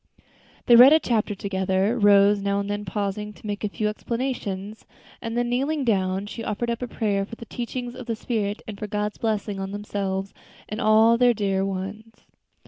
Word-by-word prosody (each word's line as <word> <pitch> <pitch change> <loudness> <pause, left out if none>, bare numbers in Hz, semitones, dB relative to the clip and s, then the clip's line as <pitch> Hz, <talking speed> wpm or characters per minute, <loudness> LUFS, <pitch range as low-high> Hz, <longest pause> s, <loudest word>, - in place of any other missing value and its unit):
They 240 - +7
read 255 +5 +10
a 315 - +6
chapter 220 -7 0
together 190 +2 0
Rose 205 -2 +5
now 200 0 0
and 200 - -3
then 205 0 -3
pausing 210 +2 -3
to - - -17
make 205 0 -4
a 210 - 0
few 210 +1 -2
explanations 215 -3 -4 0.4
and 230 +1 -4
then 240 0 +1
kneeling 275 +4 0
down, 190 -3 +1
she 225 +2 -7
offered 225 +2 -2
up 235 - -4
a 250 - -2
prayer 205 -4 -1
for 210 - -8
the 230 - -10
teachings 245 +1 -5
of 255 -1 -9
the 230 - -1
Spirit, 215 -2 -2
and 205 -2 -7
for 210 - -4
God's 210 0 -3
blessing 210 -3 -2
on 195 0 -4
themselves 195 -1 -3 0.3
and 215 +3 -4
all 220 +2 +5
their 245 -1 +5
dear 195 -2 0
ones. 200 +4 -5
210 Hz, 195 wpm, -24 LUFS, 200-230 Hz, 0.4 s, read